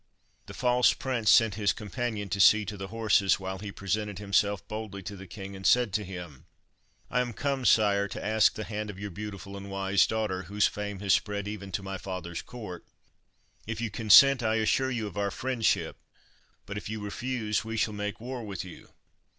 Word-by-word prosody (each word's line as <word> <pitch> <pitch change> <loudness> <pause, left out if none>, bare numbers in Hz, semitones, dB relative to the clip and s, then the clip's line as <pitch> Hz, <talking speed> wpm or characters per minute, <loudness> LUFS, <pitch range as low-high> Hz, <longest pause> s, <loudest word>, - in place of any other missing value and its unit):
The - - -9
false 125 -2 +4
prince 120 -5 -1
sent 115 -3 +6
his 100 0 +1
companion 105 0 -4
to 100 - -2
see 105 +2 +6
to 105 +1 -5
the 95 -1 -6
horses, 105 -2 +2
while 95 0 -5
he 100 0 -6
presented 105 +1 -2
himself 100 0 0
boldly 105 -2 -6
to 100 - -6
the 95 0 -10
king, 100 +1 -8
and 95 - -9
said 120 -1 +4
to 105 +2 0
him— 90 -5 -9 0.6
"I 125 - +2
am 120 -1 -3
come, 135 +1 -2
sire, 100 -2 +4
to - - -7
ask 110 0 +4
the 110 - -4
hand 105 +1 -4
of 100 - -7
your 100 0 -6
beautiful 100 0 -7
and 100 0 -8
wise 95 0 +2
daughter, 105 -4 -1
whose 100 +3 +1
fame 105 -2 -3
has 100 -2 +3
spread 100 -1 0
even 100 -2 -6
to 95 - -2
my 95 -1 -5
father's 85 -3 -5
court. 105 -8 -8 0.8
If 115 -1 -4
you 115 -2 -2
consent 120 +6 +7
I 110 -1 +1
assure 115 +4 +2
you 120 -4 -2
of 105 - -7
our 100 0 +1
friendship, 120 +4 0 0.7
but 100 - -6
if 100 - -9
you 110 0 -4
refuse 105 +1 -2
we 110 0 -4
shall 105 0 +1
make 105 -1 -4
war 125 +1 -6
with 100 -4 -5
you." 90 - -12
105 Hz, 200 wpm, -28 LUFS, 95-110 Hz, 0.8 s, consent